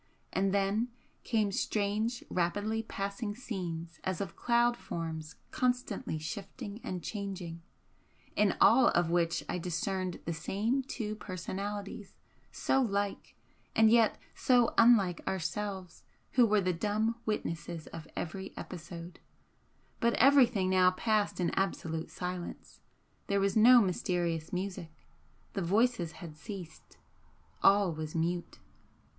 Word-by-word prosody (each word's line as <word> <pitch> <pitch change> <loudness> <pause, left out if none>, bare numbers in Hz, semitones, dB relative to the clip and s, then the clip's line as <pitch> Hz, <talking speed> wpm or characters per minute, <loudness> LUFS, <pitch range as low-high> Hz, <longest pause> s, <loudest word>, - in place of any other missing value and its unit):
And 195 0 +2
then 200 +4 +1 0.4
came 215 -4 +1
strange 215 +4 -1
rapidly 205 +5 0
passing 205 0 -4
scenes 175 -9 -5
as 185 -3 -2
of 190 -4 -4
cloud 240 0 +3
forms 160 -6 -5 0.2
constantly 250 - -1
shifting 205 - -6
and 180 -2 -4
changing, 190 -5 -5 0.7
in 210 -2 +3
all 240 +3 +7
of 175 -1 +2
which 170 -1 +1
I 180 - -2
discerned 180 +2 -2
the 170 - -1
same 215 +10 0
two 225 -5 -4
personalities 200 +1 -5 0.4
so 270 - +1
like 200 -4 -2 0.4
and 220 0 +6
yet 230 -2 +5 0.2
so 245 -2 +3
unlike 215 -7 +5
ourselves 190 +1 -3 0.3
who 245 -3 +5
were 210 -1 +3
the 185 -1 +1
dumb 215 +6 0
witnesses 165 -5 -3
of 160 - -7
every 190 +3 -5
episode, 170 0 -8 0.8
but 235 0 +2
everything 250 -7 +5
now 185 -1 +6
passed 210 +2 0
in 175 -2 +1
absolute 165 -4 -2
silence 180 -1 -6 0.5
there 200 0 +2
was 195 0 +1
no 240 +3 +8
mysterious 175 -4 0
music, 185 -2 -4 0.6
the 195 - -2
voices 190 -2 +2
had 165 -4 -9
ceased 170 -1 -9 0.6
all 195 -3 +5
was 155 0 -6
mute. 170 +1 -1
195 Hz, 120 wpm, -31 LUFS, 175-220 Hz, 0.8 s, no